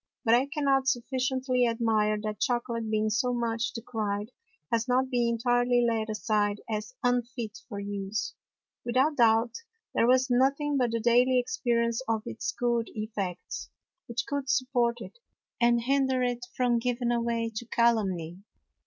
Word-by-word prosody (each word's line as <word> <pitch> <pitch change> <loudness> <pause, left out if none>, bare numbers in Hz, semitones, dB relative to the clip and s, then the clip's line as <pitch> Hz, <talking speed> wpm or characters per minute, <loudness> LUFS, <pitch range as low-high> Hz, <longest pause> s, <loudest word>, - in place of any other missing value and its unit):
But 225 - +4
I 250 +3 +4
cannot 280 -3 +1
sufficiently 255 0 +1
admire 220 -2 +1
that 215 -1 -4
Chocolate 235 -2 -1
being 215 0 +1
so 245 +3 +1
much 230 -1 -1
decry'd, 215 -2 -3 0.4
has 230 +1 +1
not 260 +1 +1
been 240 -1 +2
entirely 245 +1 +2
laid 225 -1 -1
aside 210 -1 0
as 215 -1 -4
unfit 245 -3 -1
for 205 -4 -5
Use; 200 +1 -3 0.5
without 260 +5 +1
doubt 230 0 +4 0.4
there 230 - +3
was 255 +1 +4
nothing 275 +4 +2
but 250 -3 +2
the 230 0 -1
daily 245 +3 +4
Experience 235 -1 0
of 220 -1 0
its 110 - -3
good 235 -1 0
Effects, 205 -5 -5 0.4
which 235 +1 -2
could 280 -2 -3
support 250 -3 +1
it, 480 - -10 0.4
and 235 0 +4
hinder 265 0 +2
it 245 0 -2
from 245 -2 +2
giving 245 0 -1
way 230 -1 -1
to 220 - -4
Calumny. 195 -9 +1
235 Hz, 145 wpm, -28 LUFS, 220-250 Hz, 0.5 s, But